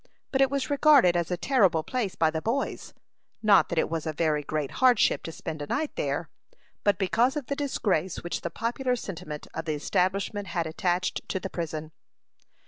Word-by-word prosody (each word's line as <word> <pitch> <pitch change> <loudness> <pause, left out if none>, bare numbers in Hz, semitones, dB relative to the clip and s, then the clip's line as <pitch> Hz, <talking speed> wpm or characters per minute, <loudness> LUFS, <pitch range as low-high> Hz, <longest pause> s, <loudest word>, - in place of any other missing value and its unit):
But 270 - +2
it 270 - +5
was 280 +1 -2
regarded 285 - +6
as 170 -1 0
a 180 - -1
terrible 185 - +3
place 230 -4 -2
by 160 -1 +2
the 160 0 -3
boys; 240 +8 -2 0.5
not 205 -2 +5
that 170 - -3
it - - +3
was 165 -1 -3
a 155 - -1
very 155 -1 +1
great 150 -1 -3
hardship 255 -1 +4
to 165 - -4
spend 155 -1 -6
a 145 - -4
night 310 - -2
there, - - -2 0.6
but 205 -2 +3
because 230 +8 +2
of 290 - -3
the 280 - -2
disgrace 195 - -1
which 175 - -3
the 170 - -3
popular 245 +7 -1
sentiment 170 -9 -7
of 160 - -4
the 155 -2 -1
establishment 195 +6 -1
had 170 -3 -1
attached 175 +3 -1
to 190 - -1
the 190 - -6
prison. 155 -2 -4
185 Hz, 195 wpm, -27 LUFS, 160-250 Hz, 0.6 s, regarded